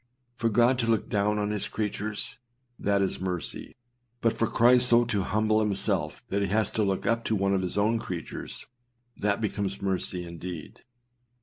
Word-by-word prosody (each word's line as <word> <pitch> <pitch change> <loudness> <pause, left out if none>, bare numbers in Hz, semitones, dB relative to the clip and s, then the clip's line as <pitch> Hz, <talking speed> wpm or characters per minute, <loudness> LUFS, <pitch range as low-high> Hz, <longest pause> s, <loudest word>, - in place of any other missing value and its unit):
For 115 -1 0
God 120 +3 +3
to 115 - 0
look 115 -2 +1
down 105 +1 +1
on 105 0 -1
his 105 -1 +2
creatures 105 0 -3 0.4
â - - -11
that 100 -1 +3
is 95 - -2
mercy; 90 -3 -4 0.4
but 115 -1 +2
for 115 - +1
Christ 125 +2 +5
so 120 0 +5
to 105 -4 0
humble 110 +3 +1
himself 105 -2 0
that 100 +1 0
he 100 - +1
has 110 +3 +1
to 110 - 0
look 95 -1 -1
up 115 0 +1
to 110 - +1
one 100 0 +1
of 95 - +1
his 90 +1 -3
own 110 +3 +2
creatures, 85 -6 -6 0.5
that 100 0 0
becomes 100 -2 -2
mercy 95 -2 -2
indeed. 85 -1 -8
105 Hz, 185 wpm, -27 LUFS, 95-110 Hz, 0.5 s, Christ